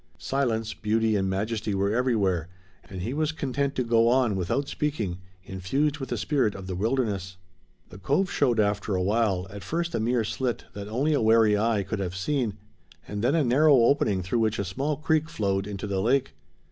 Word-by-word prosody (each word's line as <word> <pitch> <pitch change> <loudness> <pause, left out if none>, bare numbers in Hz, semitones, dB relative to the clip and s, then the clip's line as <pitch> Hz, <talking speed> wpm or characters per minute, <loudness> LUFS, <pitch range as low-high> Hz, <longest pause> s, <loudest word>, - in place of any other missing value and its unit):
Silence, 115 -5 -1
beauty 110 +1 +1
and 95 -1 0
majesty 105 +2 -2
were 100 +1 +1
everywhere, 100 -9 +1 0.4
and 95 -2 -6
he 120 - -3
was 155 +1 0
content 140 -2 -2
to 130 - 0
go 115 -1 +3
on, 120 -3 +3
without 95 +10 -1
speaking, 110 -15 -2 0.3
infused 135 - -1
with 135 - -5
the - - -2
spirit 135 -8 0
of 95 -1 -8
the 95 - -4
wilderness. 100 -3 -1 0.5
The 95 - -12
cove 165 - 0
showed 125 -5 +2
after 100 -1 +1
a 90 - 0
while, 100 -2 +1
at 100 0 -8
first 170 - -2
a - - 0
mere 120 +1 +1
slit 120 +2 -2
that 100 0 -7
only 135 +8 0
a 145 - +2
wary 110 -1 +5
eye 105 -1 +1
could 110 +1 -4
have 90 -2 -3
seen, 115 +1 -1 0.5
and 105 +1 -4
then 130 +6 +3
a 160 - +3
narrow 140 +4 +5
opening 115 -6 +3
through 115 +7 -1
which 110 -1 +1
a 100 - -2
small 140 - -2
creek 155 +1 +1
flowed 100 -4 -1
into 100 -1 -5
the 100 -2 -1
lake. 125 +5 +1
110 Hz, 195 wpm, -26 LUFS, 100-135 Hz, 0.5 s, wary